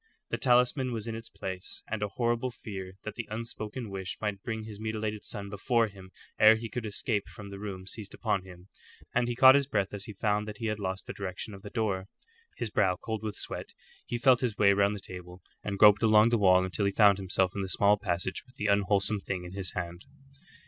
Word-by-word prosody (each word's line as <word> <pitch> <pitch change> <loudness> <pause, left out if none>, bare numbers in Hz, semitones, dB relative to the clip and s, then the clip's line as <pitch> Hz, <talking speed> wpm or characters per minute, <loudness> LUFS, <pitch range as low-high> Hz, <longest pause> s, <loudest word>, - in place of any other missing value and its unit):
The - - -1
talisman 125 +1 +3
was 110 -2 -3
in 115 - -3
its 115 0 -7
place, 95 -1 -6
and 110 -1 -3
a 105 - +1
horrible 120 +4 0
fear 95 -6 -7
that 110 - -5
the 115 +1 -6
unspoken 110 0 -5
wish 95 -1 -4
might 105 -2 -3
bring 110 -1 -4
his 105 -2 -9
mutilated 110 -1 -3
son 100 -1 -3
before 115 +3 +1
him 95 -2 -13 0.3
ere 110 +1 +8
he 115 0 -5
could 115 -2 -4
escape 105 0 -1
from 100 -3 -10
the 100 - -7
room 95 -3 -6
seized 100 +1 -6
upon 100 - 0
him, 90 0 -13 0.5
and 120 0 +2
he 120 - -1
caught 130 +2 +9
his 140 -1 +3
breath 100 -8 0
as 100 -1 -4
he 105 - -7
found 105 +1 0
that 105 -1 -6
he 115 - -5
had 105 -1 -1
lost 95 -1 -3
the - - -6
direction 100 +2 -5
of 100 - -10
the - - -8
door. 100 -5 -1 0.5
His 110 - -3
brow 90 -3 +3
cold 110 +4 -4
with 105 -2 -4
sweat, - - -5 0.3
he 120 - -2
felt 125 0 +5
his 115 -5 -1
way 100 -1 +6
round 100 +1 +2
the - - -6
table, 90 -1 -10 0.2
and 100 -1 -3
groped 105 0 +7
along 110 0 +6
the 115 -1 +2
wall 95 -2 +5
until 95 +2 -1
he 100 - +2
found 100 -1 +5
himself 95 -1 +1
in 100 - -1
the 95 - -3
small 100 +2 +4
passage 95 -2 -2
with 125 0 -24
the 105 - -4
unwholesome 100 +1 +2
thing 95 -2 -4
in 90 - -8
his 95 -2 -4
hand. 85 0 -5
105 Hz, 230 wpm, -29 LUFS, 95-110 Hz, 0.5 s, caught